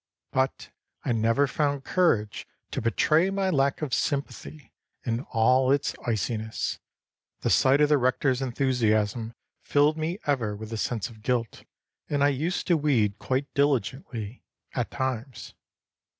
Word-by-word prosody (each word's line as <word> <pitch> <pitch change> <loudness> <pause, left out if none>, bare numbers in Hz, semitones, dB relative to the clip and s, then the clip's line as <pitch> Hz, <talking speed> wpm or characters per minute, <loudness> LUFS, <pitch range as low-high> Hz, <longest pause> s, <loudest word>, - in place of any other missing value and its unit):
But 130 0 -1 0.3
I - - +1
never 115 +4 +2
found 140 0 -1
courage 120 - +1 0.2
to - - -2
betray 155 - +3
my 195 -1 0
lack 140 -1 +1
of 135 -5 -3
sympathy 140 -1 -3 0.3
in 115 -1 -1
all 130 +3 +4
its 140 0 +1
iciness. 110 0 -2 0.6
The - - 0
sight 135 +2 +4
of 150 - +4
the 150 -2 +4
rector's 130 +1 +1
enthusiasm 115 -4 0 0.3
filled 145 +2 +2
me 165 +4 -2
ever 120 -8 0
with 110 +2 -8
a - - -2
sense 115 0 -2
of 110 -2 -15
guilt, 120 -1 -2 0.4
and 145 -1 +1
I 145 - +5
used 155 +6 -1
to 170 - +3
weed 115 -9 +1
quite 135 +2 -2
diligently, 130 -5 -1 0.3
at 120 -2 -2
times. 130 -3 -4
130 Hz, 140 wpm, -26 LUFS, 115-145 Hz, 0.6 s, I